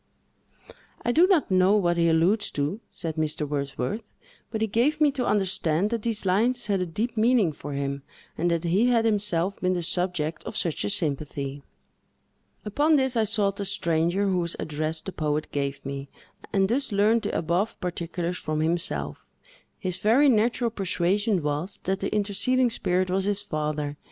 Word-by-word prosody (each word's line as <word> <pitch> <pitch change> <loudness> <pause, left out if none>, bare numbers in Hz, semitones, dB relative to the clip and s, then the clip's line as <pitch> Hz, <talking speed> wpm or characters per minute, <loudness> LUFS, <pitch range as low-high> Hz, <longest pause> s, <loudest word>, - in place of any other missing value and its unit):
"I 240 - +3
do 335 +8 +5
not 360 - +2
know 185 +3 +4
what 175 -4 +2
he 170 -1 +3
alludes 175 +7 +2
to," 145 +9 -1
said 160 -1 -5
Mr. 155 -1 -1
Wordsworth; 140 - -3 0.5
"but 220 -1 -4
he - - +3
gave 245 +8 +1
me 300 -2 +4
to 260 -2 -2
understand 190 -2 +1
that 230 -2 -1
these 220 -2 -1
lines 230 +6 +2
had 200 -3 0
a 180 - -1
deep 220 +8 -3
meaning 220 -5 +3
for 145 -1 -8
him, 140 0 -3 0.3
and 175 +2 0
that 170 -1 0
he 190 +8 +2
had 235 -2 +3
himself 200 -4 +1
been 185 0 +2
the 175 -1 -2
subject 175 -3 -1
of 215 - -5
such 170 -7 -1
a 100 - -1
sympathy." 140 0 -1 1.0
Upon 295 +9 +3
this, 265 -3 +2
I 225 -1 +3
sought 200 -2 +1
the 200 - -3
stranger, 175 0 0
whose 180 -3 0
address 155 +1 -2
the 190 - -6
poet 150 -3 -1
gave 140 -1 -3
me, 140 0 -5 0.4
and 195 -1 +2
thus 250 +4 -1
learned 210 +3 +3
the - - -2
above 175 +6 -1
particulars 175 0 -3
from 155 0 -2
himself. 170 +3 -1 0.5
His 185 -2 -4
very 255 +7 +4
natural 235 0 +2
persuasion 195 -1 0
was, 150 +6 -2
that 190 +1 -1
the 195 - -2
interceding 230 +5 +1
spirit 185 -3 0
was 190 +1 +1
his 205 0 -1
father. 150 -5 -3
185 Hz, 175 wpm, -26 LUFS, 160-215 Hz, 1.0 s, do